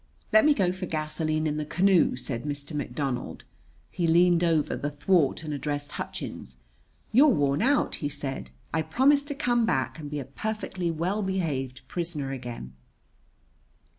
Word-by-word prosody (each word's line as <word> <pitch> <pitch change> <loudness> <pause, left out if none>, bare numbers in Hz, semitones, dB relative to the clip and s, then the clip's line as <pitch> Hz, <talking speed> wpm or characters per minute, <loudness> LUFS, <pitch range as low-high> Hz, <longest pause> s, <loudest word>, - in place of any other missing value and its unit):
"Let 325 -1 +7
me 300 -1 +5
go 185 -6 +2
for 185 0 -5
gasoline 155 0 -1
in 150 -1 0
the 155 - -1
canoe," 185 +2 +3
said 125 -1 -4
Mr. 145 +1 -5
McDonald. 135 -3 -3 0.5
He 175 -2 0
leaned 175 +1 +5
over 160 -3 +2
the 145 - -2
thwart 150 +1 +2
and 155 -1 -4
addressed 145 0 -3
Hutchins. 65 0 -6 0.5
"You're 265 +7 +7
worn 145 - +2
out," 280 +5 +2
he 145 - -2
said. 135 - -4 0.2
"I 160 - +2
promise 265 - +3
to 285 -1 -4
come 240 -4 +2
back 135 +1 0
and 150 -2 -6
be 150 - -4
a 140 - -4
perfectly 190 - -3
well 175 +6 -1
behaved 150 -10 -2
prisoner 165 -6 -3
again." 120 - -6
155 Hz, 160 wpm, -27 LUFS, 145-185 Hz, 0.5 s, Let